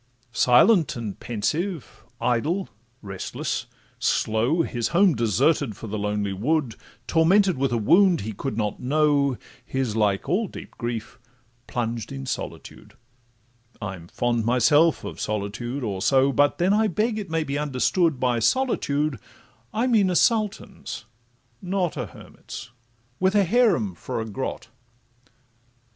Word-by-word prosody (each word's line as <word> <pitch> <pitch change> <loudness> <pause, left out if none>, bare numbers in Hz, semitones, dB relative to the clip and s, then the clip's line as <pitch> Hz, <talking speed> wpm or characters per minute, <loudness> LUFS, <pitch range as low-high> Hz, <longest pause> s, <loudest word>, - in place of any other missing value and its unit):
Silent 155 - +4
and 110 -5 -5
pensive, 155 - -3 0.2
idle, 125 +11 0 0.4
restless, 95 -2 -4 0.3
slow, 120 +10 +1
His 120 -6 -2
home 185 0 +4
deserted 120 - +1
for - - -8
the 110 0 -4
lonely 105 -1 -1
wood, 130 +5 0 0.3
Tormented 185 +3 +4
with 135 0 0
a 120 - +1
wound 175 - +4
he 110 +2 -5
could 110 +2 -4
not 105 -2 -2
know, 140 -1 +2 0.3
His, 130 -5 -2
like 105 +1 +1
all 195 +9 +1
deep - - -10
grief, 120 0 -5 0.5
plunged 115 -1 -3
in 135 0 -6
solitude: 130 - -7 0.8
I'm 95 -5 -6
fond 120 +3 -1
myself 145 +8 +3
of - - -7
solitude 110 +6 -3
or 100 -4 -3
so, 135 +4 +4
But 145 +1 +2
then, 185 +3 +2
I 215 +1 +3
beg 215 +4 0
it 200 -4 -6
may 160 0 0
be 140 -1 -3
understood, 150 +2 +1
By 125 -2 +1
solitude 150 - +1 0.5
I 230 +3 0
mean 220 -7 +3
a 180 - 0
sultan's, 215 0 0 0.6
not 185 -2 -1
A 125 -6 -3
hermit's, 110 - -11 0.5
with 190 +2 +2
a 205 - +5
haram 190 - +2
for 85 - -5
a 110 - -3
grot. 115 +1 -5
135 Hz, 135 wpm, -24 LUFS, 115-175 Hz, 0.8 s, a